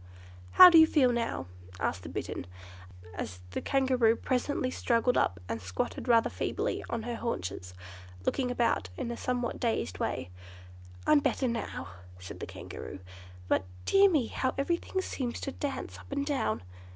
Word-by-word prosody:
"How 365 -1 +11
do 330 - +9
you 320 - +8
feel 270 -6 +4
now?" 230 - -2 0.3
asked - - -1
the - - -8
Bittern, 90 - -5 0.7
as 90 -1 -6
the - - -3
Kangaroo 255 -4 +3
presently 255 +1 -1
struggled 245 0 +1
up 90 - +1
and 115 0 -3
squatted 95 - -3
rather 230 -2 +5
feebly - - -2
on 230 -1 -2
her 240 +1 -3
haunches, 90 - -4 0.5
looking 255 -2 0
about 235 - +1
in 235 - -3
a - - -3
somewhat 245 0 -2
dazed 90 - -1
way. 90 - -2 0.7
"I'm 305 - +6
better 270 -2 0
now," 225 - -4 0.3
said 90 0 -9
the - - -5
Kangaroo, - - -8 0.5
"but, 95 - +2 0.2
dear 395 0 +6
me, 300 -9 +2
how 260 +3 -2
everything 340 +6 -1
seems 245 -8 -3
to 275 - -3
dance 280 0 -5
up - - -15
and 280 0 -1
down!" 185 - -1
240 Hz, 160 wpm, -30 LUFS, -, 0.7 s, How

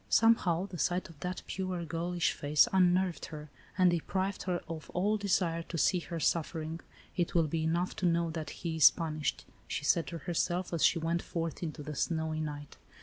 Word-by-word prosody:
Somehow 195 -6 +4
the 180 -4 -8
sight 180 +3 0
of 160 -3 -15
that 180 +3 -4
pure, 185 -2 -3
girlish 170 +1 0
face 145 +1 +3
unnerved 180 -1 +3
her, 150 -2 -9 0.3
and 185 -2 +5
deprived 190 +3 -1
her 175 -1 -1
of 160 -1 -7
all 200 +4 +2
desire 180 -5 +1
to 165 0 -6
see 180 +3 +3
her 170 +1 -5
suffering. 160 0 -1 0.2
" - - -25
It 175 -1 -1
will 165 -2 +4
be 160 +1 -1
enough 170 +3 0
to 180 - +1
know 170 -1 +1
that 160 -1 -4 0.2
he 165 -1 -1
is 155 - +10
punished," 155 -2 -3 0.2
she 145 - -3
said 165 -1 +3
to 170 - -5
herself, 175 +1 -1
as 165 - 0
she - - +5
went 165 +1 0
forth 165 -2 -4
into 155 -3 -4
the 150 +1 -5
snowy 160 +1 -1
night. 145 -1 -6
170 Hz, 200 wpm, -31 LUFS, 160-180 Hz, 0.3 s, is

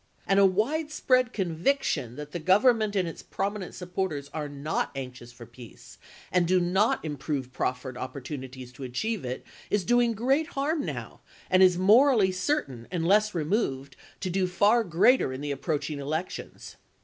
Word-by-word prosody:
And 195 0 +3
a 200 - +7
wide 275 - 0
spread 255 -4 +2
conviction 170 - -1
that 150 +1 -8
the 175 - -4
Government 210 +5 +3
and 185 -3 +1
its 165 - -7
prominent 200 -1 -4
supporters 180 -6 -3
are 150 -2 -4
not 145 +2 -2
anxious 125 -2 -7
for 120 0 -12
peace, 120 0 -14 0.3
and 180 -2 +2
do 185 +1 +4
not 180 +2 +1
improve 140 -3 -4
proffered 130 0 -3
opportunities 130 -1 -7
to 135 - -9
achieve 190 - -3
it, 125 0 -5 0.2
is 205 -2 +1
doing 240 +2 +3
great 265 +8 +1
harm 290 +2 0
now, - - -6 0.3
and 185 0 +5
is 180 -2 +6
morally 215 +1 +5
certain, 185 - -2
unless 195 +4 +2
removed, 150 - -1 0.3
to 185 - -2
do 185 0 +1
far 205 +6 +3
greater 185 - +3
in 130 +1 -6
the 145 0 -3
approaching 150 +1 -2
elections." 155 +6 -5
180 Hz, 160 wpm, -27 LUFS, 140-210 Hz, 0.3 s, a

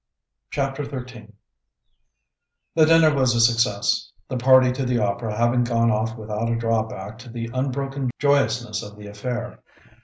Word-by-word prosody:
CHAPTER 135 0 -2
XIII 125 -5 -8 1.4
The 160 -1 +4
dinner 165 -1 +5
was 130 -4 +2
a - - +1
success, 115 -3 +2 0.2
the - - -4
party 130 0 +5
to 130 +2 -3
the 125 -1 0
opera 105 0 -2
having 120 +1 +2
gone 115 -1 +2
off 110 +2 -1
without 110 +1 -3
a 115 - +1
drawback 110 -1 -2
to 125 0 -12
the 115 0 -6
unbroken 135 0 -2
joyousness 120 -6 +1
of 105 0 -10
the 105 - -11
affair. 120 +4 -5
120 Hz, 150 wpm, -23 LUFS, 110-130 Hz, 1.4 s, dinner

